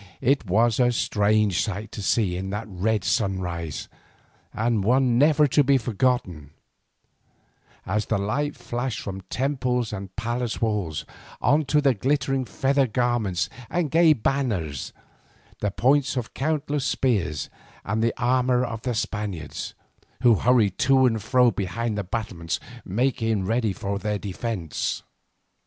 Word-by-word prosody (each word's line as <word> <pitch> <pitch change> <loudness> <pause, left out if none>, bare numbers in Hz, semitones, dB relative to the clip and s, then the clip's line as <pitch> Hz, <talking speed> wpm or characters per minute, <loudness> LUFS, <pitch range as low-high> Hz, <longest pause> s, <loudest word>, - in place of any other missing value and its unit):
It 135 -3 +2
was 115 +4 +3
a 125 -1 +4
strange 105 -4 +2
sight 105 0 -4
to 105 - -6
see 95 -1 +1
in 95 +1 -4
that 105 +3 -3
red 105 +1 -1
sunrise, 90 - -2 0.6
and 115 -2 0
one 125 +2 +3
never 150 +1 +5
to 145 - +4
be 140 0 +4
forgotten, 115 - -1 1.4
as 105 +3 -1
the 110 - +1
light 140 +9 -1
flashed 120 -2 -3
from 95 -1 -6
temples 125 -4 -1
and 95 -2 -7
palace 120 +1 -2
walls, 105 -9 -1 0.3
on 150 +1 +3
to 150 +2 +2
the 140 -2 +4
glittering 135 +3 0
feather 135 +2 +1
garments 115 -7 0 0.2
and 170 -5 -1
gay 165 -1 +6
banners, 110 - -1 0.7
the 105 - 0
points 135 +6 +2
of 120 -3 -4
countless 150 -1 -1
spears 95 - 0 0.3
and 105 +3 -1
the 115 0 +1
armour 125 0 +2
of 115 -2 -5
the 125 -1 -2
Spaniards, 100 -8 -4 0.5
who 120 -2 +7
hurried 110 -3 +2
to 130 0 +4
and 115 -3 +1
fro 125 +2 +4
behind 105 +3 -2
their 105 - -2
battlements 90 -4 -3 0.2
making 110 -1 0
ready 110 +1 +1
their 100 +2 -2
defence. 100 - -3
115 Hz, 135 wpm, -25 LUFS, 100-130 Hz, 1.4 s, who